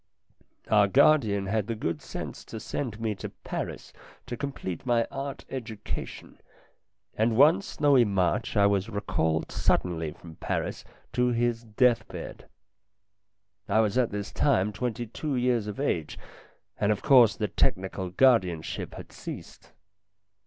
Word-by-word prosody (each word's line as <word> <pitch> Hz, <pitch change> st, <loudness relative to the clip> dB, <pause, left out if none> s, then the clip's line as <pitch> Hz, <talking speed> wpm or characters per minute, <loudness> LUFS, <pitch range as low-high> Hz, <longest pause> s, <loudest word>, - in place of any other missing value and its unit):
Our 105 Hz, -2 st, +5 dB
guardian 115 Hz, -5 st, +4 dB
had 105 Hz, +1 st, -1 dB
the 115 Hz, -, -2 dB
good 80 Hz, -7 st, -3 dB
sense -, -, -7 dB
to 110 Hz, -, -7 dB
send 115 Hz, 0 st, -4 dB
me 110 Hz, -1 st, -1 dB
to 100 Hz, -, -7 dB
Paris -, -, -6 dB, 0.3 s
to 120 Hz, -, -5 dB
complete 120 Hz, -, -5 dB
my 120 Hz, -2 st, +2 dB
art 135 Hz, 0 st, -5 dB
education, 115 Hz, -5 st, -7 dB, 0.7 s
and 110 Hz, +1 st, +1 dB
one 160 Hz, +8 st, +6 dB
snowy 145 Hz, -8 st, +3 dB
March 95 Hz, -6 st, 0 dB
I 100 Hz, -, +5 dB
was 100 Hz, +1 st, +1 dB
recalled 90 Hz, -7 st, -1 dB
suddenly 80 Hz, -3 st, 0 dB
from 80 Hz, 0 st, -13 dB
Paris -, -, -3 dB, 0.3 s
to 125 Hz, 0 st, +2 dB
his 120 Hz, -1 st, 0 dB
death 115 Hz, +2 st, +2 dB
bed. -, -, -9 dB, 1.2 s
I 110 Hz, -, +4 dB
was 105 Hz, -2 st, 0 dB
at 125 Hz, -2 st, +3 dB
this 105 Hz, 0 st, -5 dB
time 105 Hz, -8 st, +2 dB
twenty 120 Hz, +1 st, -3 dB
two 140 Hz, +5 st, -4 dB
years 120 Hz, -3 st, +1 dB
of 105 Hz, +2 st, -5 dB
age, 85 Hz, -, -1 dB, 0.6 s
and 100 Hz, -, +2 dB
of 105 Hz, -, -2 dB
course 125 Hz, -5 st, +6 dB
the 105 Hz, -, -1 dB
technical 95 Hz, 0 st, -1 dB
guardian 95 Hz, -7 st, +3 dB
ship -, -, -5 dB
had -, -, -10 dB
ceased. -, -, -9 dB
110 Hz, 145 wpm, -27 LUFS, 100-125 Hz, 1.2 s, one